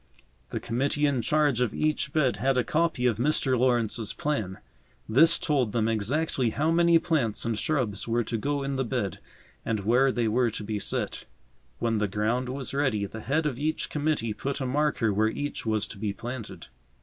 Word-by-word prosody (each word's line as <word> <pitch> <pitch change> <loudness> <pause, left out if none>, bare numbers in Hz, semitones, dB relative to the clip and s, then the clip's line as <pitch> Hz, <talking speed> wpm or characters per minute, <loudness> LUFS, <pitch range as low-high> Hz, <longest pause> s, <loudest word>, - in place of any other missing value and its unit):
The - - -3
committee 140 +5 0
in 140 -4 +1
charge 145 -1 +2
of 120 -4 0
each 155 -2 0
bed 140 -5 +1
had 135 +1 +1
a 125 - +3
copy 160 -1 0
of 120 -4 +2
Mr. 135 0 +1
Lawrence's 120 -3 +1
plan. 110 -11 -2 0.5
This 160 +9 +5
told 130 -9 0
them 115 -2 +1
exactly 120 +4 0
how 155 +8 0
many 170 0 +5
plants 145 -12 0
and 115 -1 0
shrubs 120 - -1
were 120 +1 +1
to 115 - -4
go 140 +5 -1
in 135 0 -2
the 135 - +1
bed 115 -6 -2 0.4
and 110 -3 -1
where 125 +6 +3
they 120 -2 0
were 120 +2 +2
to 110 -1 -5
be 105 0 -3
set. - - -2 0.5
When 115 -2 0
the 105 - +1
ground 110 +5 -1
was 135 0 -4
ready 130 -8 +1
the 110 +3 -8
head 150 +7 0
of 135 -4 -2
each 155 +2 -1
committee 145 -7 0
put 140 +6 -3
a 135 - -2
marker 130 -5 +1
where 110 +2 +2
each 145 -1 -4
was 110 -1 +1
to 100 - -9
be 105 -1 -2
planted. 115 -7 -7
125 Hz, 195 wpm, -27 LUFS, 110-145 Hz, 0.5 s, This